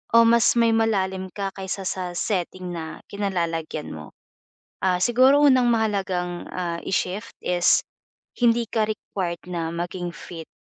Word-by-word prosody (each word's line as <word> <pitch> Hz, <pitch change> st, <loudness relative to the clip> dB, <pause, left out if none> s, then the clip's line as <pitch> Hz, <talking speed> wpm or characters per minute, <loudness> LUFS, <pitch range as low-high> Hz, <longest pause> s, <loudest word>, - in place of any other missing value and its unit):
o 230 Hz, -, +9 dB
mas 235 Hz, +1 st, +5 dB
may 230 Hz, -1 st, +4 dB
malalim 190 Hz, -4 st, 0 dB
ka 195 Hz, -1 st, -3 dB
kaysa 195 Hz, 0 st, -4 dB
sa 180 Hz, -1 st, -3 dB
setting 180 Hz, -1 st, -2 dB
na 160 Hz, -1 st, -6 dB
kinalalagyan 170 Hz, -6 st, -2 dB
mo. 75 Hz, -1 st, -9 dB, 0.7 s
Ah, 185 Hz, -1 st, +3 dB
siguro 255 Hz, +6 st, +5 dB
unang 260 Hz, -4 st, +5 dB
mahalagang, 190 Hz, -5 st, -1 dB
ah, 170 Hz, -2 st, -3 dB
i-shift 195 Hz, +4 st, -2 dB
is 175 Hz, -1 st, +3 dB, 0.6 s
hindi 235 Hz, -1 st, +3 dB
ka 220 Hz, -2 st, +1 dB
required 185 Hz, -5 st, -4 dB
na 165 Hz, -2 st, -2 dB
maging 175 Hz, +1 st, -3 dB
fit, 165 Hz, -2 st, -9 dB
190 Hz, 135 wpm, -24 LUFS, 175-220 Hz, 0.7 s, o